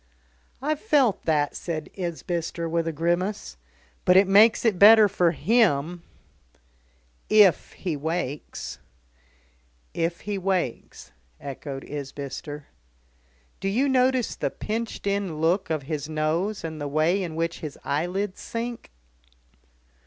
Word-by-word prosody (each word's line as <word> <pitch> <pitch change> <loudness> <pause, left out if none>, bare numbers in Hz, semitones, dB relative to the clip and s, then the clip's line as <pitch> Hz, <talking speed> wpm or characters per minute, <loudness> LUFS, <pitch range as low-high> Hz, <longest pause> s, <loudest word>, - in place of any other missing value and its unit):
"I've 305 +1 0
felt 280 - +2
that," 150 -3 +1
said 160 -3 -5
Isbister 170 -2 -3
with 165 0 -1
a - - 0
grimace. 175 +6 -1 0.5
"But 180 0 +5
it 195 0 +6
makes 215 +5 +5
it 205 -6 +2
better 215 +1 +9
for 180 -3 +2
him." 175 -3 +1 1.3
"If 205 -6 +5
he 175 -5 -3
wakes." 150 -1 -4 1.1
"If 170 +1 -2
he 205 -1 -3
wakes," 185 -9 -3 0.3
echoed 135 0 -7
Isbister. 145 +1 -7 0.9
"Do - - -3
you 250 +8 +1
notice 255 -2 +2
the - - -1
pinched 225 0 -4
in 200 -5 -1
look 175 +4 +1
of 155 -3 -1
his 150 +1 -4
nose, 160 +7 -1
and 160 -2 -5
the 145 - -2
way 155 +7 +1
in 170 -4 -4
which 165 +1 -2
his 150 -3 -7
eyelids 185 +6 -2
sink?" 235 0 -5
175 Hz, 125 wpm, -25 LUFS, 155-205 Hz, 1.3 s, better